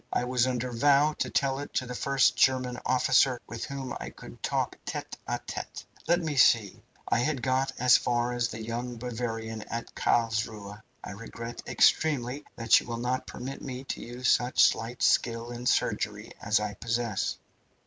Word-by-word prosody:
"I -, -, +1 dB
was 125 Hz, 0 st, +1 dB
under 125 Hz, 0 st, -2 dB
vow 145 Hz, +5 st, +4 dB
to -, -, 0 dB
tell 135 Hz, -1 st, 0 dB
it 145 Hz, -, -8 dB
to 130 Hz, -, +1 dB
the 125 Hz, -, -6 dB
first 135 Hz, +1 st, +2 dB
German 130 Hz, -1 st, +2 dB
officer 130 Hz, 0 st, +3 dB
with 115 Hz, +1 st, -6 dB
whom 135 Hz, -2 st, -5 dB
I -, -, -6 dB
could -, -, -13 dB
talk -, -, -1 dB
tete -, -, -5 dB
a -, -, -1 dB
tete. -, -, -6 dB, 0.2 s
Let 175 Hz, +1 st, +3 dB
me 155 Hz, -4 st, -3 dB
see, 115 Hz, -5 st, +4 dB, 0.3 s
I -, -, +2 dB
had 135 Hz, -1 st, -1 dB
got 130 Hz, +1 st, +1 dB
as 125 Hz, 0 st, +6 dB
far 120 Hz, 0 st, 0 dB
as 120 Hz, -1 st, 0 dB
the 110 Hz, -1 st, -7 dB
young 120 Hz, +2 st, -4 dB
Bavarian 115 Hz, -2 st, -4 dB
at 115 Hz, 0 st, -5 dB
Carlsruhe. 110 Hz, -3 st, -1 dB, 0.2 s
I -, -, -6 dB
regret 115 Hz, +3 st, -7 dB
extremely 145 Hz, -2 st, +2 dB
that 115 Hz, -1 st, +5 dB
you -, -, -11 dB
will 120 Hz, -1 st, -3 dB
not 125 Hz, +2 st, -2 dB
permit 135 Hz, +2 st, -7 dB
me 130 Hz, -1 st, -6 dB
to -, -, -3 dB
use 120 Hz, +1 st, -4 dB
such 120 Hz, +2 st, +4 dB
slight 115 Hz, +2 st, +1 dB
skill 115 Hz, 0 st, +2 dB
in 120 Hz, +1 st, -5 dB
surgery -, -, 0 dB
as 105 Hz, +1 st, +2 dB
I 105 Hz, -1 st, -3 dB
possess. 115 Hz, 0 st, -2 dB
120 Hz, 180 wpm, -28 LUFS, 115-130 Hz, 0.3 s, as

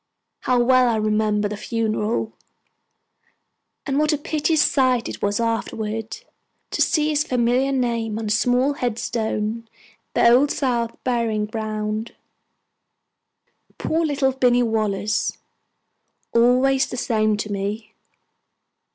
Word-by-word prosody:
How 250 Hz, -1 st, +1 dB
well 255 Hz, +1 st, +4 dB
I 230 Hz, -, +1 dB
remember 215 Hz, -1 st, +1 dB
the 210 Hz, -, -5 dB
funeral, 220 Hz, 0 st, -2 dB, 1.5 s
and 275 Hz, 0 st, 0 dB
what 305 Hz, +1 st, +2 dB
a 300 Hz, -, +1 dB
piteous 305 Hz, +1 st, +1 dB
sight 255 Hz, -4 st, +2 dB
it -, -, -7 dB
was 205 Hz, +1 st, 0 dB
afterwards 225 Hz, -1 st, -3 dB, 0.5 s
to -, -, -1 dB
see 305 Hz, -1 st, +2 dB
his 300 Hz, -1 st, +1 dB
familiar 250 Hz, +1 st, +1 dB
name 235 Hz, -4 st, -1 dB
on 225 Hz, -, -4 dB
a -, -, -3 dB
small 250 Hz, +5 st, +2 dB
headstone 230 Hz, -4 st, -2 dB, 0.2 s
in 230 Hz, +1 st, -30 dB
the -, -, +5 dB
Old 255 Hz, +5 st, +5 dB
South 240 Hz, -5 st, -1 dB
Burying 230 Hz, -4 st, 0 dB
Ground! 215 Hz, 0 st, -4 dB, 1.6 s
Poor 325 Hz, +1 st, 0 dB
little 285 Hz, -3 st, +1 dB
Binny 245 Hz, -2 st, +3 dB
Wallace! 215 Hz, -2 st, -1 dB, 1.0 s
Always 255 Hz, +4 st, +3 dB
the -, -, -6 dB
same 215 Hz, -3 st, +1 dB
to 210 Hz, 0 st, -4 dB
me. 210 Hz, +2 st, -4 dB
235 Hz, 120 wpm, -22 LUFS, 215-255 Hz, 1.6 s, the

